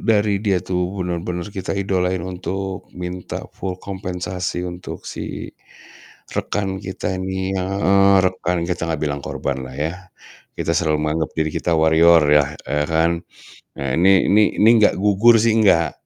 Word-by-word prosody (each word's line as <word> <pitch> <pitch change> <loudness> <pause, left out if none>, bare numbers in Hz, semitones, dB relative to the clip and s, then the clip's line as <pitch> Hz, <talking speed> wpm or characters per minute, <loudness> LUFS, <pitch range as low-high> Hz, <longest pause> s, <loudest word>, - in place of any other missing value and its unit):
dari 105 -3 +2
dia 100 -3 +1
tuh 90 +1 -2
bener-bener 90 -1 -3
kita 95 0 -4
idolain 95 -2 -1
untuk 95 +1 -5
minta 90 0 -6
full 95 -1 -4
kompensasi 90 -2 -4
untuk 90 0 -8
si - - -6 0.8
rekan 95 -2 -2
kita 95 -1 -4
ini 95 0 -3
heeh, 100 +1 +3
rekan, 90 -2 0
kita 85 0 -2
gak 80 -2 -3
bilang 75 -2 -1
korban 70 -2 -3
lah 65 - -10
ya. 85 +6 -4 0.5
Kita - - -3
selalu 75 -1 +1
menganggap 75 +1 -1
diri 80 -1 0
kita 85 +2 -1
"warrior" 80 +1 +5
yah, 75 -1 +3
eee, 75 +1 -1
kan. 80 +1 +2 0.7
Ah 70 -2 -1
ini 95 +2 +4
ini 105 +2 +5 0.2
ini 110 - +6
nggak 105 -4 +3
gugur 105 +3 +5
sih, 110 0 +3
nggak. 85 -4 +4
90 Hz, 150 wpm, -20 LUFS, 85-95 Hz, 0.8 s, ini